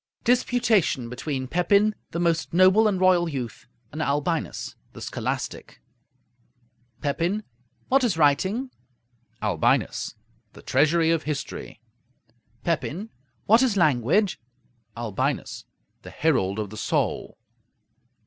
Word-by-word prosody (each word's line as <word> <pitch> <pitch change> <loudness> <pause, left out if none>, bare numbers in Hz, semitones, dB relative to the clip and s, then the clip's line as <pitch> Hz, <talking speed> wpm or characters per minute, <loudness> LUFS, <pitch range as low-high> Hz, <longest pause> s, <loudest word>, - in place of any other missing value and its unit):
DISPUTATION 235 - +2
BETWEEN 130 +1 -4
PEPIN, 200 +7 +3 0.2
THE 170 - -4
MOST 170 -1 0
NOBLE 185 +4 +6
AND 195 -3 0
ROYAL 180 -2 +4
YOUTH, 125 -7 -6 0.2
AND 155 - -5
ALBINUS 150 +3 -1 0.2
THE - - -11
SCHOLASTIC - - -4 1.2
Pepin 170 +8 0 0.4
What 270 +1 +3
is 215 -9 +1
writing? 190 - +2 0.7
Albinus 95 -7 +1 0.4
The - - -14
treasury 160 +4 +3
of 165 -1 +2
history. 145 -7 -5 0.8
Pepin 175 +5 -2 0.3
What 225 +4 +6
is 245 -6 +2
language? 155 - +2 0.6
Albinus 115 -4 -2 0.4
The - - -10
herald 100 -11 +1
of 105 -2 -4
the 110 - -8
soul. - - -1
165 Hz, 105 wpm, -25 LUFS, 140-200 Hz, 1.2 s, NOBLE